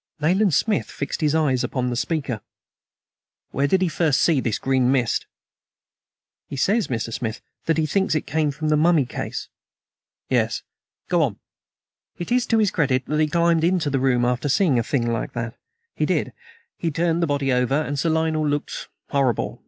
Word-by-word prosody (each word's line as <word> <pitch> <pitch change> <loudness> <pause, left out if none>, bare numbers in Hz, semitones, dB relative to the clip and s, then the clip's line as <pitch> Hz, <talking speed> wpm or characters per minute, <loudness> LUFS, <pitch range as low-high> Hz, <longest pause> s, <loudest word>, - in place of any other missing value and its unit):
Nayland 180 +4 +3
Smith 220 -2 +1
fixed 140 - -4
his 155 0 +2
eyes 140 -6 +2
upon 125 -2 -1
the - - -2
speaker. 135 -4 -2 1.1
"Where 140 +2 +1
did 190 +5 +2
he - - +2
first 160 -4 +1
see 160 -5 +3
this 115 -5 -1
green 130 -1 +2
mist?" 125 -4 +1 1.2
"He - - -6
says, 205 - +1
Mr. 115 -2 -3
Smith, 115 -1 -3 0.3
that 165 -1 +2
he 160 - +2
thinks 190 +2 +1
it 155 - -1
came 155 +1 0
from 155 +2 -3
the 155 - +4
mummy 160 -2 +4
case." - - -5 0.8
"Yes; - - 0 0.4
go - - +2
on." - - 0 0.8
"It 175 - -6
is 245 -1 +2
to 225 - +3
his 215 -3 +3
credit 135 -5 +1
that 150 +1 -1
he 155 - +3
climbed 170 +1 +2
into 170 -4 +1
the 135 - +1
room 125 -2 +2
after 125 +3 0
seeing 145 -4 +3
a - - 0
thing 120 0 0
like 115 -1 -2
that. 115 -1 -4 0.4
He - - -1
did. - - 0 0.5
He 170 - 0
turned 165 +2 0
the 170 - +2
body 140 -2 0
over, 125 +3 +2
and 145 -2 -2
Sir 165 - +1
Lionel 160 -1 +1
looked 145 0 -3 0.2
horrible. 135 -5 0
145 Hz, 185 wpm, -23 LUFS, 130-165 Hz, 1.2 s, the